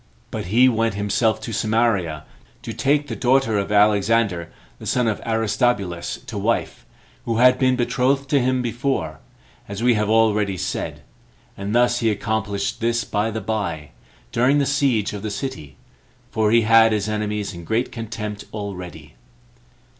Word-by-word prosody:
But - - -4
he 120 +7 +5
went 115 -3 +1
himself 105 +2 +1
to 110 +1 -6
Samaria, 110 -10 0 0.4
to - - -5
take 145 +1 +1
the - - -4
daughter 125 -4 +2
of 100 +1 -3
Alexander, 105 -3 +2 0.3
the - - -8
son 125 -2 +1
of 110 - -1
Aristobulus, 110 -5 0
to - - -5
wife, - - -2 0.4
who 115 -1 -1
had 125 +1 +5
been 130 -1 +3
betrothed 135 +2 +1
to 140 - +4
him 130 0 +1
before, 120 - -2 0.5
as 100 +3 -5
we 125 0 +5
have 105 -1 0
already 105 -3 +2
said; - - -4 0.5
and 100 +3 -4
thus 120 0 +3
he 115 - +2
accomplished 110 +1 -2
this 115 +1 +1
by 105 +2 -1
the 110 0 -4
by, 85 - -3 0.4
during 125 +5 +3
the 140 - +2
siege 135 -8 +1
of 100 - -5
the 110 - -3
city, 100 - -6 0.6
for 110 -2 +1
he 115 +2 +5
had 115 0 +5
his 105 -1 -1
enemies 105 -1 -2
in 85 0 -9
great 110 +8 -1
contempt 110 -3 -6
already. 90 -8 -7
110 Hz, 160 wpm, -22 LUFS, 100-120 Hz, 0.6 s, he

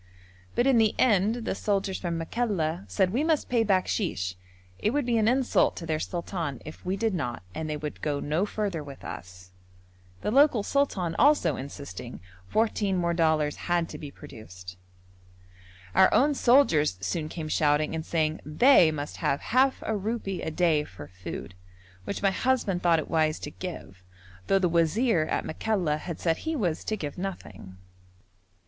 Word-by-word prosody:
But, 240 - +2
in 265 -4 +5
the 220 -2 +3
end, 225 0 +2
the - - -1
soldiers 195 -1 -1
from 170 -2 -2
Makalla 175 -2 -1
said 190 -2 +1
we 265 +6 +1
must 315 -2 +1
pay 235 -2 +3
bakshish: 185 - 0 0.5
it - - +1
would 285 +3 0
be 235 -2 +2
an 215 - +2
insult 255 +1 +2
to 170 - -7
their 155 -1 -1
sultan 170 -5 -4
if 155 - -10
we 185 +2 -2
did 225 0 0
not 125 - -3
and 155 +6 -4
they 150 - -2
would 150 0 -6
go 145 -2 -1
no 155 +9 0
further 200 -8 -3
with 140 -2 -11
us. 90 0 -9 0.7
The - - -1
local 270 -4 +5
sultan 195 -12 0
also 290 +4 +4
insisting, 140 - -8 0.3
fourteen 210 - +1
more 170 -1 +1
dollars 155 -3 +2
had 175 -1 +2
to - - -8
be 145 - -7
produced. 95 - -11 1.2
Our 190 - +6
own 290 +3 +4
soldiers 235 - +4
soon 155 - -3
came 160 -2 -5
shouting 150 0 +2
and 160 0 -3
saying 155 -1 -1
they 175 - +5
must 145 -1 -5
have 140 - 0
half 260 +1 +3
a 220 - 0
rupee 205 -2 -3
a - - -3
day 160 -2 +2
for 90 - -11
food, 90 0 -8 0.5
which 200 - -4
my 195 - +4
husband 210 -5 0
thought 170 -2 +4
it 155 - -3
wise 155 -1 +1
to 145 - -6
give, 160 - -8 0.5
though 195 - +4
the 190 -2 +2
wazir 170 +3 +2
at - - -1
Makalla 175 -4 -1
had 170 0 -6
said 165 -2 +1
he 320 0 -3
was 180 - -1
to 215 - -1
give 150 -2 -5
nothing. 105 - -7
175 Hz, 175 wpm, -27 LUFS, 150-215 Hz, 1.2 s, Our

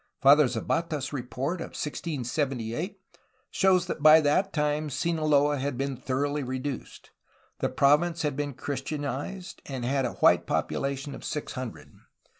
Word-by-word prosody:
Father 140 +1 +7
Zapata's 135 +5 -2
report 135 +6 -3
of - - -7
1678 145 - -3 0.5
shows 185 -2 +3
that 170 - -4
by 155 +1 +9
that 160 +6 +2
time 150 0 0
Sinaloa 150 -1 +2
had 140 -1 -2
been 135 0 -2
thoroughly 145 +4 -1
reduced. 130 +1 -5 0.5
The - - 0
province 160 +4 +3
had 150 -3 0
been 145 -1 -3
Christianized, 145 +7 -4
and 130 -3 -4
had 135 +1 +1
a 120 - -2
white - - +4
popula 140 0 -1
tion 140 +1 -7
of - - -9
six 150 - -4
hundred. 130 -3 -7
145 Hz, 140 wpm, -27 LUFS, 130-155 Hz, 0.5 s, by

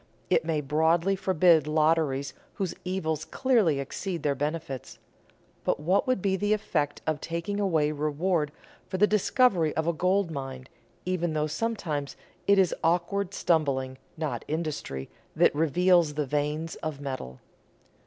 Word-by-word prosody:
It - - +4
may 160 -2 0
broadly 160 +6 +2
forbid 180 -4 +4
lotteries 150 -3 +1 0.2
whose 190 -3 -2
evils 160 -4 -2
clearly 225 - +2
exceed 165 +4 -4
their 145 -2 +2
benefits. 145 -2 -4 0.7
But - - 0
what 180 - +1
would 255 -7 +1
be 195 -1 +2
the 205 +2 +1
effect 155 -8 -1
of 155 -2 -1
taking 170 +5 -3
away 160 -7 +2
reward 155 +1 0 0.4
for 185 - -3
the 205 - +6
discovery 210 - +2
of 160 - +1
a 170 - +1
gold 185 +2 +1
mine, 135 -3 -6 0.4
even 175 -3 -1
though 150 -1 +1
sometimes 155 -6 -3 0.3
it 200 0 +5
is 190 -3 +4
awkward 180 +4 0
stumbling, 130 -6 0 0.2
not 155 -2 -3
industry, 150 - -3 0.3
that - - +4
reveals 165 +1 +3
the 150 -1 0
veins 150 +3 -2
of 155 -3 -5
metal? 130 - -6
160 Hz, 145 wpm, -27 LUFS, 150-185 Hz, 0.7 s, the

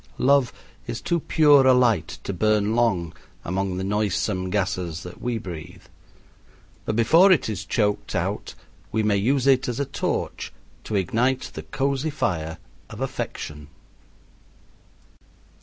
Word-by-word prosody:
Love 135 -2 +3 0.4
is - - -4
too 170 - 0
pure 145 -4 +5
a 130 - +7
light 120 -8 +2
to 100 - -3
burn 105 +3 +1
long 95 -9 +1 0.3
among 95 +1 -2
the 95 - -3
noisome 95 -2 -1
gases 90 -4 -2
that 90 - -10
we 120 -1 -1
breathe, 85 -7 -8 1.0
but 110 - -1
before 165 - +6
it 175 - +3
is 105 -3 -3
choked 105 -1 -1
out - - -2 0.4
we 110 0 0
may 105 -1 +2
use 125 +6 +1
it 135 -1 +4
as 120 0 -3
a 140 - 0
torch 135 - -3 0.3
to 110 - -4
ignite 120 +7 0
the 80 - -6
cozy 135 - -1
fire 85 - -2 0.3
of - - -9
affection. 75 -1 -5
110 Hz, 140 wpm, -24 LUFS, 95-130 Hz, 1.0 s, a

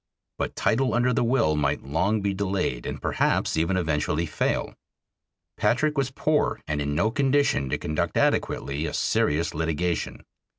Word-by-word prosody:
But - - -2
title 130 +2 +1
under 125 +1 +2
the - - +1
will 115 -11 +2
might 70 -2 0
long 90 +10 0
be 100 0 0
delayed 95 -10 -2
and - - -4
perhaps - - 0
even 85 +4 +1
eventually 80 -1 0
fail. 75 - -1 0.8
Patrick 150 +5 +1
was 135 -2 0
poor 150 +3 0
and 75 -1 -1
in 75 0 -2
no 110 +8 +2
condition 135 - +2
to - - 0
conduct 75 0 -2
adequately 70 +4 0
a - - -4
serious 75 +3 +1
litigation. 80 +1 -2
90 Hz, 155 wpm, -25 LUFS, 75-120 Hz, 0.8 s, under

